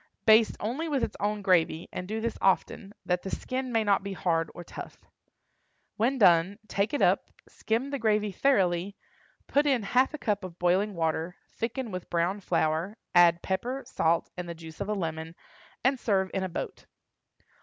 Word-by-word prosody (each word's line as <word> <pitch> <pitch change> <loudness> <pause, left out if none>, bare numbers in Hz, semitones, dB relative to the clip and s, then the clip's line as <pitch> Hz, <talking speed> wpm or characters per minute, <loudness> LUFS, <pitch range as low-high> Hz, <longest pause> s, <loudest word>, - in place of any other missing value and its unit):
Baste 220 0 +5
only 270 +10 -2
with 275 -5 0
its - - -2
own 210 0 -1
gravy, 170 -3 +2
and 180 - -5
do 220 +2 -3
this 230 0 -2
often, 195 +1 +1
that 180 0 0
the 195 - -6
skin 255 +4 -3
may 225 -2 +2
not 205 -2 +3
be 200 0 -5
hard 165 -3 0
or 175 - -7
tough. - - -9 1.0
When 245 +5 +1
done 180 -2 +5
take 200 +3 0
it - - +1
up, - - +3 0.2
skim 235 +5 -2
the 280 - -2
gravy 210 -2 +1
thoroughly, 190 -5 +1 0.5
put 290 +1 +2
in 260 -6 +2
half 255 +8 +2
a - - -5
cup 210 -7 -1
of 180 -2 -8
boiling 185 +4 +1
water, 165 +1 -1 0.2
thicken 235 0 -3
with 185 -1 -6
brown 175 +4 0
flour, 170 +2 0 0.2
add 170 -1 +5
pepper, 245 +8 -2
salt, 165 +1 +1
and 180 -1 -6
the 170 - -5
juice 160 -1 -11
of - - -3
a - - +1
lemon, 165 -2 -4 0.5
and 265 0 +2
serve 190 -5 +1
in 190 - -1
a 190 - -2
boat. - - -6
195 Hz, 185 wpm, -28 LUFS, 175-225 Hz, 1.0 s, Baste